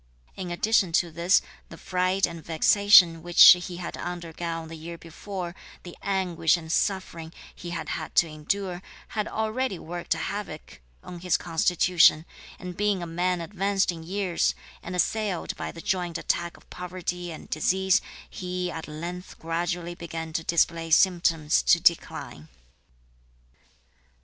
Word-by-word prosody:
In 185 -2 -5
addition 190 +1 +2
to 170 0 +2
this, 170 +3 +3 0.3
the - - -11
fright 185 +1 +1
and 170 -2 -8
vexation 170 0 +5
which 175 +1 +9
he 175 0 +1
had 175 - -6
undergone 170 -1 -5
the 165 - -8
year 165 +2 -8
before, 175 +2 -7 0.3
the 175 - -10
anguish 180 -4 +1
and 160 -1 -7
suffering 170 -4 -1 0.2
(he 175 - -9
had 170 -1 -5
had 155 - -5
to 170 - +5
endure), 180 +4 -3 0.3
had 210 -1 -2
already 220 0 -2
worked 175 +1 -8
havoc 155 - -6 0.2
(on 175 -1 -9
his 180 0 +1
constitution); 170 -1 +3 0.3
and 180 -1 -8
being 205 -2 0
a - - -3
man 175 +1 -1
advanced 195 +2 0
in 165 -2 -8
years, 185 +1 -1 0.3
and 180 - -6
assailed 200 0 -1
by - - -5
the 165 - -10
joint 175 -2 -1
attack 170 0 -2
of - - -22
poverty 180 -1 -5
and 160 - -11
disease, 190 +5 +2 0.3
he 180 -1 -4
at 160 - -7
length 170 +4 -7
gradually 170 +1 -3
began 165 -1 -7
to 165 - -2
display 165 0 +1
symptoms 165 -3 +3
of 170 - -9
decline. 120 - 0
175 Hz, 145 wpm, -26 LUFS, 165-185 Hz, 0.3 s, which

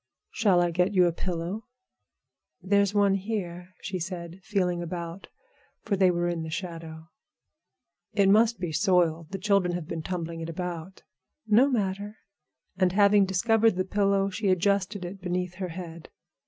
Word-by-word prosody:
"Shall 195 -7 +3
I 175 - 0
get 180 +4 +1
you 180 -1 +6
a 175 - +2
pillow?" 180 +5 -4 0.9
"There's 200 +2 +2
one 200 -1 +4
here," 185 -3 -4
she 190 -1 -3
said, 175 0 -6
feeling 180 -3 -1
about, 170 +2 -6 0.6
for 210 - 0
they 190 -1 +4
were 175 0 0
in 170 -1 -2
the 160 - -5
shadow. 165 -1 -7 1.0
"It 200 -2 +3
must 220 +2 +4
be 175 -3 -3
soiled; 170 -3 +2
the 195 - -4
children 195 -3 +1
have 175 -3 -5
been 165 - -4
tumbling 170 -1 -4
it 165 - -5
about." 175 +1 -6 0.4
"No 225 +6 +5
matter." 205 -3 -2 0.6
And 185 -2 +2
having 200 0 +5
discovered 220 +3 +2
the 185 0 -1
pillow, 195 0 +1
she 205 +2 -2
adjusted 190 +1 +1
it 190 +2 -8
beneath 180 0 -2
her 185 -2 -4
head. 170 -1 -8
185 Hz, 155 wpm, -27 LUFS, 175-200 Hz, 1.0 s, you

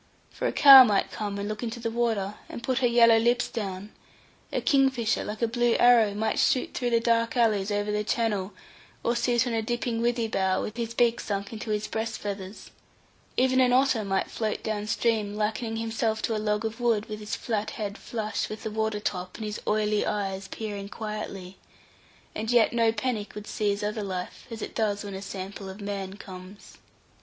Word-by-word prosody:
For - - -2
a - - 0
cow 275 -2 +10
might 205 -5 +1
come 205 -2 -4
and 200 0 -3
look 215 0 -4
into 235 0 -4
the 230 -1 -3
water, 225 -4 0 0.2
and 235 - -8
put 260 0 0
her 250 - +3
yellow 230 -1 +6
lips 240 +2 +2
down; 200 -2 -5 0.6
a - - 0
kingfisher, 260 -6 +2
like 215 +2 -5
a - - +4
blue 240 0 +2
arrow, 230 -4 +5
might 220 +1 0
shoot 255 - +2
through 245 -2 -1
the 235 -1 +3
dark 230 +1 +1
alleys 215 -4 +2
over 205 0 -1
the 210 0 0
channel, 210 -3 -1 0.5
or 235 - +1
sit 240 +1 +2
on 240 - -2
a 225 - +1
dipping 240 0 -2
withy 235 -1 +1
bough 190 -3 +1
with 215 - -4
his 230 -1 -3
beak 235 -1 +3
sunk 200 +1 -4
into 220 0 -6
his 210 0 -1
breast 220 +1 -3
feathers; 200 -1 -7 0.7
even 260 0 +3
an 250 -1 +4
otter 260 -3 +3
might 195 -1 -1
float 220 -2 -2
downstream 215 0 -1
likening 220 +2 -2
himself 225 -1 -1
to 225 - 0
a 215 - -2
log 210 +1 0
of 225 +2 -4
wood, 230 -3 +1
with 215 -2 -6
his 210 0 -4
flat 220 -2 -2
head 205 -2 -4
flush 215 -2 -3
with 215 - -7
the 220 - -3
water 220 -1 -1
top, 185 -3 -4
and 220 - -5
his 210 0 -5
oily 210 0 +1
eyes 195 -1 -2
peering 200 -1 -6
quietly; 210 -4 -6 0.7
and 220 +1 -4
yet 240 -2 +4
no 230 -1 +3
panic 225 -3 -3
would 210 0 -7
seize 205 -1 -1
other 210 +1 -2
life, 185 +1 -5
as 230 -1 -6
it - - -6
does 210 -2 0
when 200 -1 -6
a 190 - -6
sample 195 0 -7
of 190 +2 -9
man 200 -1 -4
comes. 190 +1 -12
215 Hz, 200 wpm, -27 LUFS, 205-230 Hz, 0.7 s, cow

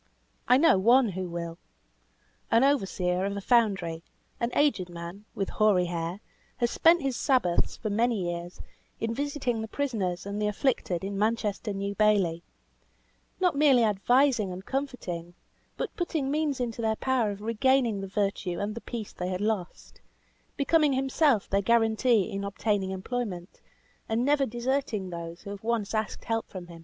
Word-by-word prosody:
I 250 - +6
know 285 - +5
one 240 +4 +5
who 185 -1 -4
will. 170 0 -5 0.9
An 230 +2 +4
overseer 190 -9 +1
of 200 +1 -2
a - - -1
foundry, 195 -8 +1 0.4
an 235 - 0
aged 275 -12 +2
man, 175 +4 -8
with 195 - -2
hoary 210 -4 +3
hair, 170 +2 -4 0.4
has 240 -1 0
spent 335 0 +4
his 270 -2 -1
Sabbaths, 245 - +1
for 215 - -3
many 220 -3 +1
years, 175 +1 -8 0.4
in 225 0 -1
visiting 275 -4 -2
the 220 - -4
prisoners 215 -10 -2
and 200 +1 -4
the 210 - +1
afflicted 210 -5 0
in 195 0 -3
Manchester 215 -1 0
New 200 0 -3
Bailey; 200 -6 +2 1.0
not 360 -4 +2
merely 280 -4 +5
advising 225 +1 +3
and 185 +2 -8
comforting, 185 -11 -4 0.4
but - - -4
putting 315 -6 -1
means 300 -2 0
into 235 -2 -3
their 220 -1 +1
power 255 -3 +1
of 200 0 -6
regaining 230 -1 +2
the 195 - -5
virtue 195 -3 -1
and 205 +1 -2
the 230 - -7
peace 230 -4 -6
they 180 0 -4
had 185 -1 -2
lost; 205 -4 -3 0.6
becoming 295 0 +3
himself 265 -3 +2
their 200 +1 +1
guarantee 225 0 +3
in 200 0 -3
obtaining 200 -1 -1
employment, 190 -2 -5 0.5
and 225 +3 +1
never 285 -1 +3
deserting 240 -5 -2
those 170 0 -7
who 200 - -7
have 200 0 -8
once 225 -3 -1
asked 215 0 -2
help 225 0 -2
from 185 -2 -8
him. 170 -1 -12
215 Hz, 165 wpm, -28 LUFS, 190-250 Hz, 1.0 s, I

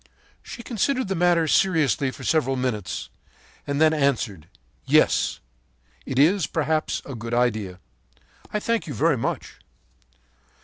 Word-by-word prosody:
“She 235 - -9
considered 250 0 -1
the 195 - 0
matter 175 -2 +3
seriously 155 -6 +2
for - - -10
several 140 -5 +1
minutes, 125 -7 -3 0.6
and 140 0 -1
then 160 0 +5
answered: 125 - -1 0.4
'Yes, - - +3 0.7
it 130 - -3
is, 165 +5 +4
perhaps, 155 -1 -1
a 140 - -7
good 115 0 -4
idea. 110 -7 0 0.7
I 210 - -1
thank 230 -2 -1
you 145 - -5
very 155 +5 +3
much.' 90 - -4
145 Hz, 130 wpm, -24 LUFS, 125-170 Hz, 0.7 s, then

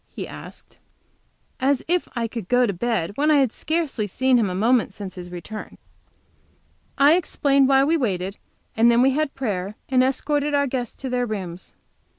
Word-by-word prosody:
he - - -7
asked. - - -11 0.8
As 270 0 +1
if 355 +1 +1
I 235 -1 -1
could 225 -4 -7
go 245 0 +4
to 200 - -1
bed 185 -2 -1
when 300 +2 +2
I 305 - +5
had 270 -5 +3
scarcely 310 -9 -2
seen 255 +5 +2
him 210 -4 +1
a 180 - -4
moment 225 +1 +2
since 200 -2 -7
his 180 -2 -9
return! 180 +5 -8 1.2
I 285 +2 +6
explained 280 -5 +2
why 270 0 +5
we 320 +4 +2
waited, 195 - -2 0.4
and 230 +1 +5
then 235 +1 +4
we 270 - +4
had 300 +1 -1
prayer 205 -5 -3
and 255 -1 +4
escorted 290 +2 0
our 280 0 +3
guests 250 -3 -3
to 265 - -2
their 245 -1 0
rooms. 185 -5 -6
245 Hz, 180 wpm, -23 LUFS, 205-275 Hz, 1.2 s, I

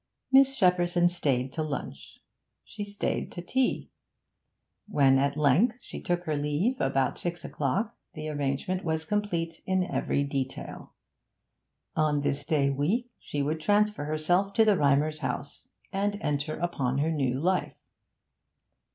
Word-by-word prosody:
Miss 270 0 +6
Shepperson 175 -2 +3
stayed 135 -6 -1
to 160 - -2
lunch. 155 -2 -6 0.4
She 210 - -7
stayed 205 0 -3
to 175 - -5
tea. 260 +7 0 1.0
When 135 -8 +4
at 140 +1 0
length 175 - +3
she - - -7
took 175 0 -1
her 155 -3 -1
leave, 150 - 0
about 135 0 +1
six 175 -1 -4
o'clock, 195 - -1 0.2
the 155 -1 -5
arrangement 145 +5 -2
was 160 -2 -1
complete 170 -5 -2
in 185 -1 +2
every 140 -5 0
detail. 135 -2 -5 1.0
On 150 -2 +2
this 140 0 0
day 145 -3 +2
week 200 - 0
she 145 -1 -3
would 155 +3 -2
transfer 205 -1 +2
herself 175 +6 +1
to 225 +1 +5
the 210 -2 +5
Rymers' 150 0 +2
house, 135 0 -5 0.3
and 205 +1 0
enter 150 -1 -2
upon 140 -7 -1
her 155 +3 +1
new 135 -4 0
life. 180 +4 0
155 Hz, 140 wpm, -28 LUFS, 140-190 Hz, 1.0 s, Miss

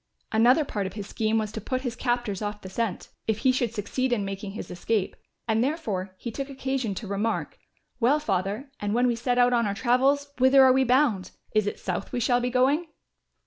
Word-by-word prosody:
Another 245 +7 +4
part 205 -7 -2
of - - -8
his 205 -2 -6
scheme 220 +2 0
was 215 -1 -1
to 220 - -6
put 255 +5 -2
his 245 -3 -3
captors 240 -6 -1
off 210 0 -4
the 190 - -9
scent, 225 -3 -3 0.2
if 220 -2 +1
he 260 - +7
should 245 -3 0
succeed 235 +4 -2
in 210 -5 +1
making 195 0 -5
his 205 - -7
escape, 190 +3 -1 0.3
and 225 +1 +2
therefore 210 - -2
he 235 - -5
took 275 +4 -5
occasion 265 -5 -2
to 215 - -6
remark; 205 +3 -2 0.4
"Well, 260 +5 +3
Father, 205 +3 -2
and 205 +1 -1
when 245 +1 +3
we 240 -1 +2
set 245 +1 -1
out 245 0 +4
on 235 -3 +2
our 200 - -2
travels, 270 +5 +2
whither 265 +1 +7
are 260 -1 +7
we 265 +1 +3
bound? 245 -7 +2 0.2
Is 215 -1 +2
it - - -2
south 185 +1 -4
we 245 - -1
shall 245 +1 +2
be 245 0 -1
going?" 270 +7 +2
235 Hz, 220 wpm, -26 LUFS, 205-255 Hz, 0.4 s, he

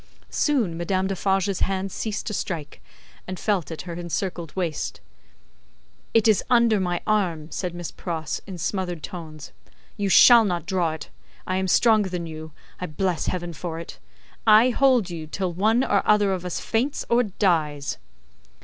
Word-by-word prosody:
Soon, 245 - +1
Madame 185 +3 -1
Defarge's 195 0 0
hands 195 0 -1
ceased 215 -2 -3
to 210 - -3
strike, 160 -8 -4 0.5
and 185 -1 -5
felt 190 -8 0
at 160 - -6
her 175 -1 -6
encircled 170 -1 -4
waist. 170 -5 -3 1.1
"It 225 -1 +4
is 215 -3 +4
under 235 -3 +4
my 175 -2 -1
arm," 175 -7 0
said 180 -2 -3
Miss 175 -1 -5
Pross, 160 -4 -4
in 190 -3 -7
smothered 175 -1 -3
tones, 155 -4 -8 0.5
"you 200 -2 -1
shall 235 +4 +8
not 175 -6 -2
draw 180 -4 0
it. 155 -2 -9 0.3
I 185 - -1
am 190 0 0
stronger 215 0 +4
than 175 -2 -4
you, 160 -1 -8 0.3
I 180 - -3
bless 175 +2 -1
Heaven 175 -2 -3
for 165 +1 -5
it. 165 - -9 0.5
I 220 +4 +7
hold 250 -7 +3
you 160 -2 -6
till 180 +2 -3
one 220 +7 +2
or 200 -5 +2
other 205 -2 +3
of 180 -1 -4
us 180 - -3
faints 250 +6 -1
or 235 +1 +4
dies!" 160 - 0
185 Hz, 165 wpm, -24 LUFS, 170-205 Hz, 1.1 s, shall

